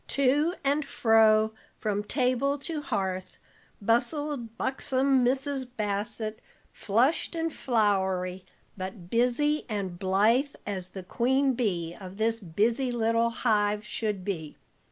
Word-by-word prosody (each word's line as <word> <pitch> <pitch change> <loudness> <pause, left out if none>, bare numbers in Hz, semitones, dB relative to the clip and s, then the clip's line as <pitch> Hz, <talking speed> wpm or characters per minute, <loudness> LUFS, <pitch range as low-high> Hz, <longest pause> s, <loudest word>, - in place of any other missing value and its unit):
To 285 +6 +2
and 285 +2 +2
fro, 220 -4 +4 0.2
from 205 -1 -1
table 255 +4 +1
to 300 +2 -4
hearth, 185 -7 -3 0.4
bustled 240 +2 0
buxom 265 0 +1
Mrs. 265 +1 0
Bassett, 215 +1 -2 0.3
flushed 245 - +1
and 325 -1 -1
floury, 190 -6 0 0.3
but 185 -2 -7
busy 250 +6 +2
and 190 -5 -3
blithe 215 +9 +2
as 185 -3 -4
the 190 0 -8
queen 265 +7 +2
bee 175 -9 -1
of 190 0 -9
this 225 +1 +1
busy 225 +8 0
little 230 0 +2
hive 210 -3 +1
should 210 -3 -3
be. 160 -7 -4
225 Hz, 115 wpm, -28 LUFS, 200-265 Hz, 0.4 s, fro